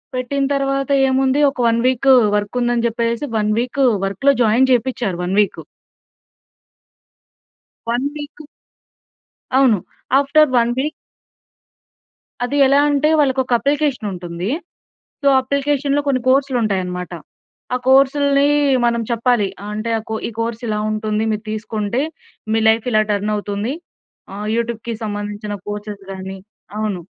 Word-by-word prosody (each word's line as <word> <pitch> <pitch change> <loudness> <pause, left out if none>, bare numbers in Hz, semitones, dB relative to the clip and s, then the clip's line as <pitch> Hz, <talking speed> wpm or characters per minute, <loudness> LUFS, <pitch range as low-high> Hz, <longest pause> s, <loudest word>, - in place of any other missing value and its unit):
పెట్టిన 275 +2 -1
తరవాత 275 0 -1 0.2
ఏముంది 265 +1 +2
ఒక - - -20
1 230 0 +1
వీక్ 260 +1 +3 0.3
వర్కుందని 240 +3 -1
జెప్పేసేసి, 235 +3 -1
1 210 0 +1
వీక్ 255 +3 -2 0.2
వర్క్‌లో 270 +8 +2
జాయిన్ 240 +5 +3
జేపిచ్చారు 240 -6 0
1 180 +2 -2
వీక్. 205 - -2 2.3
1 240 +3 0
వీకు 300 +1 -9 1.1
అవును. 245 -7 +4 0.4
ఆఫ్టర్ 290 +2 +4
1 235 0 +3
వీక్ 300 +3 -1 1.5
అది 280 +4 -2
ఎలా 275 +1 +4
అంటే, 290 +1 +2
వాళ్ళకొక 260 -2 +1
అప్లికేషనుంటుందీ. 210 - -2 0.7
సో, - - -2
అప్లికేషన్‌లో 280 +1 0
కొన్ని 260 -2 +1
కోర్స్‌లుంటాయనమాట. 215 -10 0 0.6
ఆ - - +2
కోర్సులునీ 280 +1 +4 0.4
మనం 235 0 +1
చెప్పాలి. 235 -3 +1 0.2
అంటే, 215 +2 -3
ఆ - - -5
కో 220 - -1
ఈ - - -6
కోర్సిలా 230 -2 -2
ఉంటుంది. 215 0 -1
మీరు 215 +2 -4
తీసుకుంటే, 215 +2 -2 0.5
మీ 225 - +2
లైఫిలా 220 0 +2
టర్నవుతుంది. 205 +3 -2 0.6
ఆహ్, 210 +1 -5
యూటూబ్‌‌‌‌‌‌‌‌‌‌‌‌‌కి 235 0 -3
సంబందించిన 205 0 -4
కోర్సెస్ 205 -1 -6
గానీ 190 0 -7 0.4
అవును. 210 -4 -2
235 Hz, 115 wpm, -19 LUFS, 210-270 Hz, 2.3 s, అవును